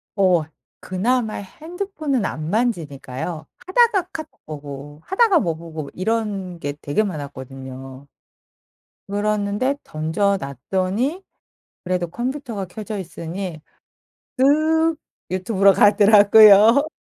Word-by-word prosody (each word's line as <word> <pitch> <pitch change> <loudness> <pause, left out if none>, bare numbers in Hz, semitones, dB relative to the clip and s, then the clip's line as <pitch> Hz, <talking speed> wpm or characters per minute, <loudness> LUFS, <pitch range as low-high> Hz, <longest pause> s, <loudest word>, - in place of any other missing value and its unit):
어 185 -5 +3 0.4
그나마 220 +4 -1
핸드폰은 310 - -4
안 155 -3 -4
만지니까요. 160 - -3 0.2
하다가 390 -3 +3
카톡 315 -5 -9
보고 145 -1 -9
하다가 390 -2 +3
뭐 170 -4 -1
보고 160 -3 -8
이런 195 -3 -2
게 145 -2 -3
되게 145 +9 0
많았거든요. 135 -5 -8 1.0
그랬는데 210 +5 0
던져 160 +6 0
놨더니 190 - -2 0.6
그래도 180 -1 -1
컴퓨터가 240 - -4
켜져 210 +3 -6
있으니 170 -1 -6 0.8
슥 315 +4 +3 0.4
유튜브로 195 +1 +3
가더라고요. 210 +5 +7
200 Hz, 240 characters per minute, -21 LUFS, 160-245 Hz, 1.0 s, 가더라고요